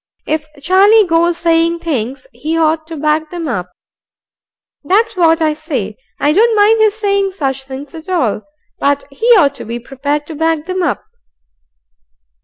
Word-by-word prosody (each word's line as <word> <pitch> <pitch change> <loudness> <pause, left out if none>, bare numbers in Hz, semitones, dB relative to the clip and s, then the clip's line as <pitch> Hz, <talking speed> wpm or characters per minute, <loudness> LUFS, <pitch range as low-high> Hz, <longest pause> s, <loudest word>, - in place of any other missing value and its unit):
"If 310 0 -2
Charlie 395 +7 +5
goes 340 0 +2
saying 335 0 +2
things, 275 - -3
he 320 +2 -3
ought 315 0 +1
to 325 -1 -7
back 305 +1 0
'em 345 -2 -4
up. 180 -9 -3 1.1
That's 435 +8 +1
what 330 -2 +3
I 310 -1 +2
say. 275 - -4 0.2
I 295 +1 +2
don't 450 +5 +3
mind 425 +2 +4
his 430 -1 +3
sayin' 400 -2 0
such 270 -7 -3
things 270 +1 -8
't 325 +2 -10
all, 250 - 0 0.4
but 285 0 +1
he 360 +12 -3
ought 285 -6 +3
to - - -9
be 235 +2 -5
prepared 285 +4 -3
to 320 - -8
back 320 0 -1
'em 370 0 -2
up." 345 - -1
320 Hz, 165 wpm, -15 LUFS, 285-365 Hz, 1.1 s, Charlie